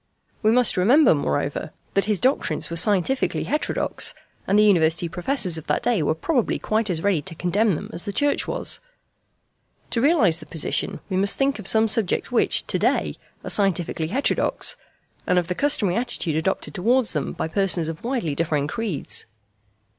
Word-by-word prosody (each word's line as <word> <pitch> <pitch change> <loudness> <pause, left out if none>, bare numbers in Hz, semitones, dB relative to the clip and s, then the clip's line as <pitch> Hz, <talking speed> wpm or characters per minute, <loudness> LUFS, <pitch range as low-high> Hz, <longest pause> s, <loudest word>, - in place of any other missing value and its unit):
We 215 - +3
must 245 -2 +4
remember, 245 - +5
moreover, 105 - -2 0.2
that 195 - +2
his 210 -3 0
doctrines 250 - 0
were - - -3
scientifically 205 +8 +1
heterodox, 300 +2 -1 0.3
and 200 - +3
the 210 - +6
University 170 -4 +3
Professors 180 - -1
of 155 - -15
that 150 - 0
day 235 -8 +1
were 155 - 0
probably 245 - 0
quite 215 0 0
as 165 -3 -2
ready 200 -6 +2
to 170 +1 -6
condemn 195 +4 +1
them - - -6
as 170 - -3
the 205 - -3
Church 285 +7 +1
was. - - -1 1.1
To 230 - 0
realise 235 - +3
the 155 - -12
position 155 0 -2
we 190 - -2
must 200 +1 +1
think 275 -3 +1
of 200 - -2
some 220 +1 +4
subjects 215 -3 0
which - - +2
to - - -1
day - - 0 0.3
are - - -5
scientifically 175 -5 +1
heterodox, 255 - 0 0.5
and 180 - +2
of 175 -2 +1
the - - 0
customary 215 -6 +1
attitude 235 -10 -2
adopted 160 +5 -2
towards 230 +5 +1
them 150 -3 -2
by - - -3
persons 180 -2 +1
of 165 0 -6
widely 235 - -2
differing 150 -1 0
creeds. 195 -1 -3
195 Hz, 175 wpm, -23 LUFS, 165-230 Hz, 1.1 s, the